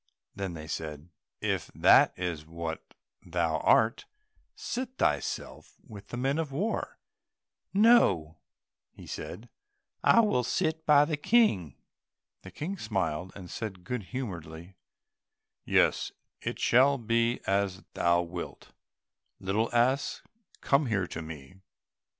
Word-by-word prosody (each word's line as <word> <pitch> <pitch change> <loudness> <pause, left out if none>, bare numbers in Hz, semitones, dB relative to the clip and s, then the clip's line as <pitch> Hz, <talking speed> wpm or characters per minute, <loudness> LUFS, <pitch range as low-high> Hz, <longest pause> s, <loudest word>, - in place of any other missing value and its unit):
Then 95 -3 -4
they 80 -1 -8
said, 75 0 -5 0.3
"If - - -1
that - - +6
is 85 -4 -3
what 80 0 -7 0.3
thou 85 -2 -1
art, 110 +1 +3 0.5
seat 255 +1 -5
thyself 70 -2 -2
with 105 -1 -11
the 120 - -6
men 135 +5 0
of 155 -4 -2
war." 195 +12 -2 0.7
"No," 100 - +4 0.7
said 110 - -7
he, 120 - -19 0.5
"I 230 - +6
will 205 - +1
sit 160 +4 -1
by 145 -1 +7
the 155 -1 -2
King." 145 - +2 0.7
The 95 - -10
King 170 - -5
smiled, 95 -5 -2
and 95 -3 -9
said 95 -1 -6
good 110 +2 -4
humouredly, 85 -8 -6 0.9
"Yes, - - +2 0.3
it - - -3
shall 135 +3 +4
be 115 0 +1
as 95 -1 0
thou 85 0 +2
wilt, 85 0 -8 0.7
little 105 +4 0
ass, 125 +4 +1 0.4
come 140 0 +2
here 100 -5 0
to 85 - -6
me." 80 +1 -10
100 Hz, 120 wpm, -29 LUFS, 85-135 Hz, 0.9 s, by